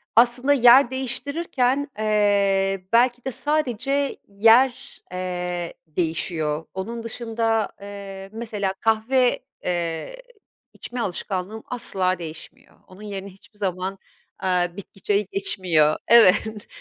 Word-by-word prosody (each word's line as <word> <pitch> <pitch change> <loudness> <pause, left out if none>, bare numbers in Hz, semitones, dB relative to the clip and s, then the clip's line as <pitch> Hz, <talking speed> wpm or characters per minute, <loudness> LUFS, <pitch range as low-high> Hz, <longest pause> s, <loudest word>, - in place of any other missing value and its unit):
Aslında 245 +4 +4
yer 245 0 +7
değiştirirken, 265 +1 -1
eee, 200 -3 +2
belki 245 +1 +3
de 265 - -2
sadece 280 0 -1
yer, 225 +5 +3
eee, 180 -1 -4
değişiyor. 160 -1 -1
Onun 230 +5 -5
dışında, 225 -1 -1
eee, 195 -1 -8
mesela 210 -4 -3
kahve, 235 +3 +2 0.3
eee, 175 - -3 0.5
içme 245 0 -7
alışkanlığım 195 +1 -4
asla 185 -7 0
değişmiyor. 160 -2 -11
Onun 185 +2 -15
yerine 200 -2 -6
hiçbir 195 +2 -19
zaman, 190 0 -2 0.4
aaa, 180 -2 0
bitki 195 0 -11
çayı 205 0 +1
geçmiyor. 165 -6 +2
Evet. 220 -1 +5
205 Hz, 105 wpm, -23 LUFS, 185-240 Hz, 0.5 s, yer